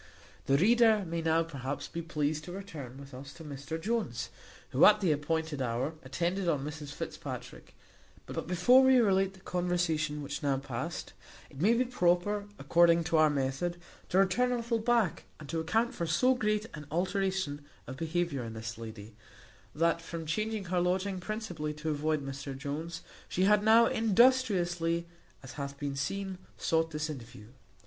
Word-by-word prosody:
The 135 - +4
reader 220 +2 +5
may 170 0 -3
now, 165 0 +3
perhaps, 140 -4 -5
be 170 - -5
pleased 155 -2 -2
to 175 - -7
return 160 -10 -8
with 140 -1 -11
us 135 +2 -9
to 165 - -11
Mr 145 +1 -6
Jones, 170 - -2 0.4
who, 130 - +3
at 210 0 +8
the 185 -6 +2
appointed 155 0 -1
hour, 125 +5 -1
attended 170 +7 -1
on 145 -4 0
Mrs 150 -1 -6
Fitzpatrick; - - -7 0.5
but - - -5
before 180 +9 +6
we 260 0 +6
relate 195 -4 +3
the 190 - -17
conversation 170 -5 -1
which 140 0 -5
now 140 -2 +1
past 135 +4 -5 0.4
it 140 0 -8
may 220 +6 +5
be 250 +2 +2
proper, 205 -2 +1
according 170 0 +4
to 160 0 +1
our 155 0 +6
method, 145 +5 -1 0.3
to 185 - +1
return 195 +6 +3
a - - +2
little 235 -1 -1
back, 225 -5 +1
and 155 - -10
to 165 - -1
account 225 +9 +1
for 170 - -3
so 250 +11 +4
great 215 -3 0
an 150 -1 -8
alteration 185 -3 -1 0.2
of 130 - -7
behaviour 165 -3 -1
in 115 -1 -6
this 115 +1 -6
lady, 110 -1 -9 0.6
that 170 +2 +2
from 165 -1 -6
changing 215 +5 -2
her 180 0 0
lodging 185 +2 0
principally 175 -7 -4
to 155 +1 -3
avoid 150 -1 -1
Mr 135 0 -6
Jones, 155 +4 -5 0.3
she 185 - 0
had 205 +1 +4
now 225 +2 +7
industriously, 195 -8 +3 0.4
as 135 - -9
hath 140 -1 -6
been 140 -1 -3
seen, 190 +7 -3 0.2
sought 165 0 +1
this 155 0 -3
interview. 115 -7 -9
165 Hz, 170 wpm, -31 LUFS, 145-195 Hz, 0.6 s, at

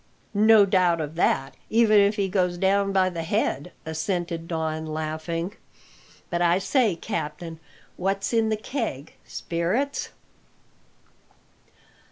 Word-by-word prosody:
"No 215 0 +6
doubt 180 -4 +3
of 155 -1 -4
that, 135 -5 +1 0.2
even 220 -2 +5
if 200 +1 +4
he 200 -2 0
goes 180 -2 0
down 195 +2 +2
by 190 -1 +3
the 170 -2 -4
head," 165 -3 -1
assented 165 +1 -3
Don, 160 -1 -2
laughing. 160 +3 -3 0.8
"But, 175 0 0
I 175 0 +4
say, 215 0 +2
captain, 160 +1 -5 0.4
what's 195 +3 -1
in 225 -1 +3
the 215 - 0
keg 215 - -4
spirits?" 185 +12 -2
180 Hz, 120 wpm, -25 LUFS, 165-205 Hz, 0.8 s, No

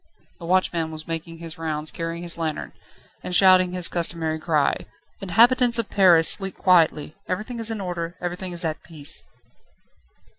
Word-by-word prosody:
The 170 - -9
watchman 175 -3 0
was 155 0 -5
making 165 0 -5
his 165 -1 -9
rounds, 155 -1 -3
carrying 165 0 -5
his 170 -1 -2
lantern, 160 -2 -4 0.5
and 180 - -2
shouting 185 -1 +5
his 180 -2 +1
customary 165 -2 -2
cry: 155 -3 0 0.3
"Inhabitants 235 +6 +4
of 230 -2 -2
Paris, 175 -5 +5
sleep 195 -1 +4
quietly. 160 -5 +2
Everything 215 +6 -4
is 225 0 -2
in 225 -2 -3
order, 175 -2 -5
everything 180 +1 -4
is 175 -1 -3
at 155 -1 -3
peace." 155 -2 -7
170 Hz, 155 wpm, -23 LUFS, 160-185 Hz, 0.5 s, shouting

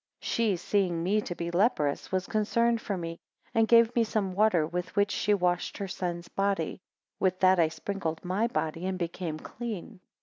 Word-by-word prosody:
15 - - -7
She 220 -5 +1
seeing 180 -2 0
me 205 +4 +2
to 175 - -5
be 170 0 -4
leprous, 170 - +1
was 185 -1 0
concerned 230 +3 +1
for 200 -4 -3
me, 165 -1 -5 0.3
and 225 0 +3
gave 230 0 +5
me 235 - +4
some 210 -4 -1
water 195 -5 +3
with 175 +2 -4
which 200 -1 +3
she - - -2
had 205 -1 +4
washed 175 0 0
her 200 - -3
son's 175 -2 -4
body, 195 -3 -1 0.4
with 185 -1 +1
that 185 -1 +5
I 165 - +5
sprinkled 165 -1 -4
my 195 +6 +1
body, 165 -6 -2
and 190 -1 -2
became 170 -2 -3
clean. 220 +1 -7
190 Hz, 195 wpm, -29 LUFS, 175-215 Hz, 0.4 s, gave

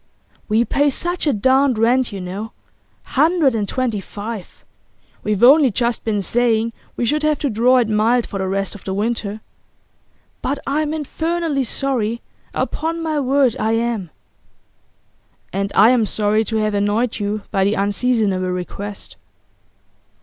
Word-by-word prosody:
'We 220 +3 +3
pay 285 +4 +2
such 345 +4 -2
a - - +4
darned 260 +2 +3
rent, 240 +3 +2
you 200 - -6
know 190 +5 -6 0.5
hundred 305 -1 +2
and 210 -3 -1
twenty 250 -5 -1
five. 205 +1 -8 0.6
We've 210 0 -1
only 275 +2 +7
just 235 +1 -1
been 210 -3 -1
saying 230 0 +1 0.2
we 240 - 0
should 300 +5 +1
have 305 -1 +2
to 280 -2 -2
draw 245 +4 +4
it 240 -3 +2
mild 225 +3 +2
for 195 - -6
the 190 - -1
rest 195 0 -1
of 205 - -12
the 190 - -3
winter. 215 0 -2 1.0
But 280 +2 -1
I'm 300 +2 0
infernally 315 -1 -1
sorry; 235 -3 -1 0.3
upon 330 +1 -2
my 310 -2 -1
word 270 -2 +2
I 220 +1 +1
am.' 225 -5 -1 1.4
'And 195 +1 -2
I 215 +4 +7
am 235 -4 +2
sorry 215 +1 +1
to 220 - -3
have 215 -1 0
annoyed 205 +4 0
you 205 0 -2
by 195 -2 +2
the 200 +2 +2
unseasonable 200 -2 0
request. 195 +3 -6
230 Hz, 150 wpm, -19 LUFS, 205-270 Hz, 1.4 s, only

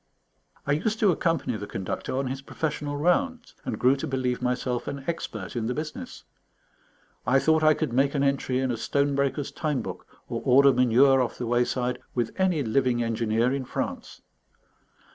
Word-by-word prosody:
I 145 - 0
used 205 +9 0
to 205 -3 +5
accompany 165 -7 0
the 105 0 -6
Conductor 95 +6 -4
on 135 - 0
his 135 +1 -4
professional 145 0 -3
rounds, 240 - 0
and 110 - -3
grew 130 +4 +4
to - - -4
believe 125 -2 -1
myself 125 0 -1
an 140 -1 -5
expert 115 - -4
in 115 -2 -1
the 125 - -2
business. 155 0 -6 1.0
I 130 - +5
thought 160 +3 +3
I 155 -1 +5
could 155 -7 -2
make 140 +3 +2
an 140 - +1
entry 140 -2 +1
in 130 -1 0
a 120 - -2
stone 140 +4 0
breaker's 140 +1 -1
time 150 -5 -2
book, - - -7 0.2
or - - -4
order 135 +2 +6
manure 125 +2 +5
off 125 - -2
the 125 - -3
wayside 125 +1 0 0.2
with 120 -2 0
any 180 -6 +2
living 120 0 +1
engineer 115 +2 +1
in 135 -1 -2
France. - - -5
135 Hz, 180 wpm, -26 LUFS, 125-145 Hz, 1.0 s, order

